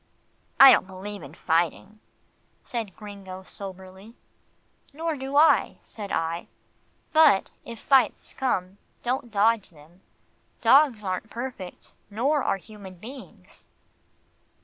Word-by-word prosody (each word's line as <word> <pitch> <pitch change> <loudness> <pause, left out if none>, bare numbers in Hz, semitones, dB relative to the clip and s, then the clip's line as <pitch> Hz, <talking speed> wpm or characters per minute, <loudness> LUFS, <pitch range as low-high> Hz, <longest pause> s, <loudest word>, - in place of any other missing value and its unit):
"I 270 -1 +11
don't 185 - +3
believe 195 +2 -8
in 145 +2 -11
fighting," 175 +6 -1 0.6
said 225 -6 -5
Gringo 195 -3 -10
soberly. 190 +3 -10 0.8
"Nor 325 +1 -2
do 270 0 -6
I," 315 +2 +4
said 205 -3 -9
I, 165 +1 -2 0.7
"but 310 -11 +5
if 230 -2 -9
fights 270 -2 +2
come, 195 -7 -2 0.2
don't 245 0 -2
dodge 220 0 +2
them. 165 +3 -20 0.6
Dogs 250 -2 +4
aren't 185 +3 -3
perfect, 235 -7 -8 0.2
nor 270 +8 +1
are - - 0
human 200 -1 -12
beings." 250 +9 -13
210 Hz, 110 wpm, -25 LUFS, 185-255 Hz, 0.8 s, I